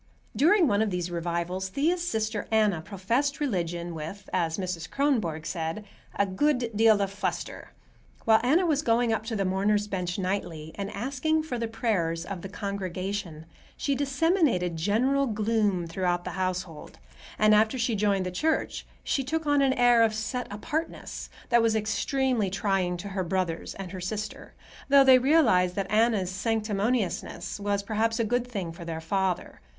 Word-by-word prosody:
During 340 - +5
one 205 -3 +2
of 220 - +1
these 180 -2 -3
revivals 170 +2 -2
Thea's 325 - +1
sister 220 -10 -2
Anna 210 -6 +2
professed 230 - -1
religion 175 - -2
with, 165 +6 -7
as 165 -3 0
Mrs. 180 -3 -4
Kronborg 215 - 0
said, 165 +4 -3 0.3
"a 200 - +2
good 245 +4 0
deal 220 -1 +5
of 195 - -3
fluster." 200 - -4 0.5
While 220 -1 +6
Anna 305 +10 +3
was 300 -4 +2
going 235 -3 +2
up 220 0 -3
to 230 - -2
the 195 -2 0
mourners' 205 +2 +1
bench 180 -3 -3
nightly 180 -5 -3
and 200 -1 -4
asking 280 +7 0
for 250 -6 -4
the 230 - -1
prayers 185 -8 -1
of 190 -3 -6
the 195 - -7
congregation, 190 -4 -4 0.3
she 280 - 0
disseminated 275 - +1
general 250 +11 +1
gloom 210 -4 +1
throughout 175 +1 -1
the - - -5
household, 185 -4 -4 0.4
and 215 0 +5
after 220 +4 +3
she 235 -1 0
joined 200 -2 +1
the 180 - -3
church 315 - -1 0.2
she 270 - 0
took 320 +4 -2
on 290 -1 +3
an 270 -1 +3
air 245 -2 +5
of 220 -1 +3
"set 245 +3 -3
apartness" 315 +10 -4 0.2
that 235 - +5
was 225 -1 +2
extremely 235 +1 0
trying 190 -2 0
to 200 +4 -6
her 190 -1 -2
brothers 175 -2 -2
and 190 -2 -7
her 185 -1 -6
sister, 210 +4 -5 0.3
though 280 0 +7
they 260 -1 +7
realized 245 - +4
that 195 -1 -3
Anna's 215 -4 +2
sanctimoniousness 210 -2 -1
was 200 0 -1
perhaps 225 +2 0
a - - +3
good 245 +2 0
thing 195 -9 -4
for 170 +1 -10
their 165 -1 -4
father. 190 +2 -2
205 Hz, 165 wpm, -27 LUFS, 185-245 Hz, 0.5 s, though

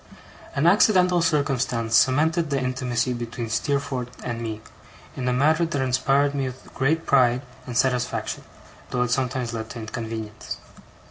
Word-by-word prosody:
An 140 - +1
accidental 180 -1 +5
circumstance 135 -7 +1
cemented 155 +7 +3
the 140 -1 +1
intimacy 125 -1 -1
between 120 -1 -5
Steerforth 130 0 -1
and 120 -1 -4
me, 110 -2 -4 0.5
in 125 - -3
a - - +3
manner 155 +6 +3
that 145 -3 -2
inspired 135 +2 +2
me 140 -1 -1
with 130 0 -10
great 155 +5 +1
pride 125 -1 +3 0.2
and 120 -2 -3
satisfaction, 125 -1 0 0.5
though 125 - +1
it 125 - -2
sometimes 125 -2 -1
led 110 -1 -5
to 115 - -7
inconvenience. 110 -1 -6
130 Hz, 145 wpm, -24 LUFS, 120-140 Hz, 0.5 s, accidental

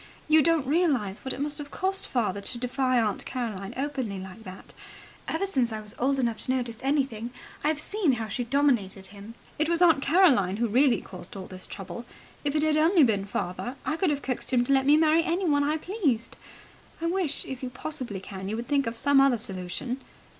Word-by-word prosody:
You 310 0 +6
don't 320 -1 +2
realize 275 - +1
what 265 - -3
it - - -4
must 295 +1 -2
have 290 -1 -7
cost 385 +4 0
father 210 -6 -1
to 240 - -4
defy 255 +1 +1
Aunt 215 -3 0
Caroline 215 -7 -4
openly 265 -7 -2
like 190 +4 -9
that. 185 0 -10 0.5
Ever 325 +5 0
since 260 -11 +1
I 220 - -3
was 210 0 -8
old 275 +2 +2
enough 235 -4 -1
to - - +1
notice 240 -3 -3
anything, 265 -5 0 0.3
I've 300 0 +1
seen 365 -3 +1
how 225 -2 -3
she 245 +4 -2
dominated 235 -7 +1
him. 205 +3 -11 0.2
It 310 +1 +1
was 340 -1 +2
Aunt 330 -5 +5
Caroline 275 - +4
who 235 +1 +1
really 250 +3 +3
caused 180 0 -10
all 190 - -6
this 185 0 -6
trouble. 215 +4 -7 0.4
If 290 0 -1
it 300 - +2
had 310 -1 +3
only 325 +1 +5
been 205 -6 +2
father, 200 +5 -4
I 310 - 0
could 360 +1 +1
have 285 -1 -1
coaxed 255 -2 -1
him 245 -2 +3
to 275 - +1
let 270 0 +3
me 295 +1 +7
marry 320 +1 +4
anyone 335 -4 +1
I 300 +2 +1
pleased. 305 - -1 0.6
I 330 - -3
wish, 345 -3 0
if 265 -2 -6
you 255 - -3
possibly 255 -6 -5
can, 190 0 -7
you 215 - -2
would 235 +2 -5
think 280 -3 +1
of 230 0 -3
some 275 +2 +4
other 275 -3 +4
solution." 210 +5 -4
260 Hz, 210 wpm, -27 LUFS, 220-300 Hz, 0.6 s, me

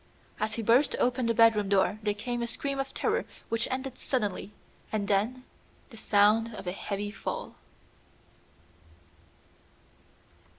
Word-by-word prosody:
As 215 0 -1
he 230 - -3
burst 240 +7 +4
open 250 -1 +1
the 230 - +2
bedroom 215 -3 +5
door 200 +1 +2
there 210 -1 0
came 240 +3 -3
a 235 - -1
scream 275 +3 -3
of 270 0 -2
terror - - 0 0.3
which 230 0 0
ended 260 0 -4
suddenly, 210 -5 -2 0.4
and 210 -2 -1
then 220 +6 +1 0.5
the - - -11
sound 215 +1 +3
of - - -8
a 180 - -1
heavy 205 +2 -4
fall. 205 - -5
225 Hz, 135 wpm, -29 LUFS, 205-245 Hz, 0.5 s, bedroom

